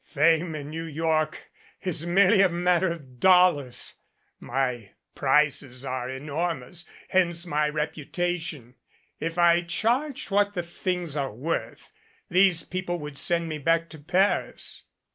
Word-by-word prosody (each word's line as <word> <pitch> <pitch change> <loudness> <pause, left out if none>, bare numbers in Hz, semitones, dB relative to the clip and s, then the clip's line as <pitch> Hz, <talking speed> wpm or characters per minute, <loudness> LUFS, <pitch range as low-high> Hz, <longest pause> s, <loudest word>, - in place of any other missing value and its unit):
"Fame 160 +2 +2
in 145 0 -6
New 165 +1 -4
York 155 0 -1 0.3
is 170 -2 -2
merely 195 +3 +5
a 195 - +5
mat 175 0 +2
ter 190 -2 +1
of 135 -7 -14
dollars. 180 -8 +3 0.5
My 125 -6 -2 0.2
prices 135 -2 +1
are 130 -1 -3
enormous 155 +3 -3 0.2
hence 175 -2 +1
my 150 -2 +1
repu 150 -1 -4
tation. 165 -8 -3 0.5
If 165 +1 -3
I 170 0 +5
charged 235 - -1
what 205 +1 +2
the 175 - -1
things 175 -2 -3
are 140 -2 -1
worth, 140 +10 -4 0.4
these 180 -2 +4
people 180 -1 -3
would 150 -3 -6
send 170 -1 +1
me 155 -1 -4
back 165 +3 +1
to 155 - -11
Paris." 180 +7 0
165 Hz, 140 wpm, -26 LUFS, 145-180 Hz, 0.5 s, merely